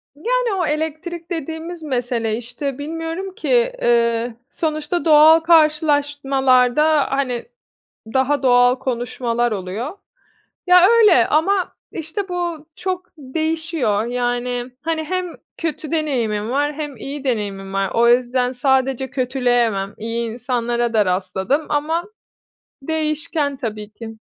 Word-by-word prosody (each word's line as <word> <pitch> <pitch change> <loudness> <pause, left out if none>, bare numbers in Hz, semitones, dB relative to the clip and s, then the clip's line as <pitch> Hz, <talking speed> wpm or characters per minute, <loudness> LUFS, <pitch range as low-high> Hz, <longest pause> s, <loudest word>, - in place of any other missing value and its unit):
Yani, 480 +6 0
o - - +1
elektrik 320 +3 -3
dediğimiz 325 +1 -5
mesele, 240 -5 -1
işte, 250 +3 -5
bilmiyorum 325 +5 -5
ki, - - +1
eee, 235 0 +2
sonuçta 310 +2 -2
doğal 315 +1 +7
karşılaşmalarda, 290 -3 +3
hani, 260 -3 -1 0.7
daha 270 +2 +2
doğal 245 -1 +5
konuşmalar 240 -2 -1
oluyor. 210 - -4 0.7
Ya, 360 0 +7
öyle 425 - +6
ama, 365 +5 +1 0.2
işte, 340 +5 -4
bu 345 -4 -3
çok 370 -1 -3
değişiyor. 315 -6 -1
Yani, 245 0 -2
hani, 320 -1 -1
hem 365 +1 -3 0.2
kötü 315 -2 -4
deneyimim 235 -9 -1
var 290 +3 +1
hem 295 -3 -5
iyi 280 +4 -7
deneyimim 200 -5 -2
var. 195 -2 0
O 235 +1 +4
yüzden 250 +1 +2
sadece 265 0 +1
kötüleyemem, 245 -6 0
iyi 230 +1 -3
insanlara 240 -1 -1
da 210 -3 +3
rastladım 190 +10 -1
ama 315 +4 0 0.8
değişken 305 -1 -1
tabii 215 -5 -5
ki. 225 0 -9
275 Hz, 115 wpm, -20 LUFS, 240-320 Hz, 0.8 s, doğal